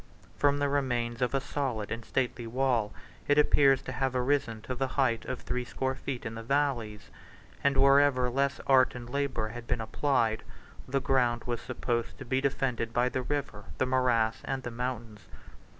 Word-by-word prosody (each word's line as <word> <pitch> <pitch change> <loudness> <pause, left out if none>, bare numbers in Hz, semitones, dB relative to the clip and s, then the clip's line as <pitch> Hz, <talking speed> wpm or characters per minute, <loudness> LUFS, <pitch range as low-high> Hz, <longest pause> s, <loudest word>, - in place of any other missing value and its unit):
From 145 0 +3
the 145 0 +1
remains 120 -4 -1
of 125 +2 +1
a - - +3
solid 130 -6 -3
and 115 +1 -4
stately 125 -2 -2
wall, 120 -3 +1 0.4
it 145 - +3
appears 140 -2 +5
to - - -5
have 135 -1 -1
arisen 125 -3 +1
to 130 - -4
the 135 +2 -1
height 125 -4 +2
of 130 - -4
threescore 125 +2 -2
feet 130 -1 -5
in 110 - -4
the 115 - -6
valleys; 115 -5 -1 0.5
and 140 -1 +3
wherever 140 -2 +5
less 140 +2 0
art 130 -2 +4
and 120 -1 -7
labor 135 -4 -1
had 120 +1 -8
been - - 0
applied, 110 -1 0 0.5
the 135 +1 0
ground 120 -3 +1
was 120 -2 -3
supposed 120 -1 -3
to 135 - -8
be 130 +2 0
defended 125 -4 -1
by 125 +1 +2
the 130 - -2
river, 130 -6 -3
the - - +2
morass, 125 -3 +2
and 135 -1 -3
the 120 - -5
mountains. 115 -3 -5
125 Hz, 180 wpm, -29 LUFS, 115-135 Hz, 0.5 s, appears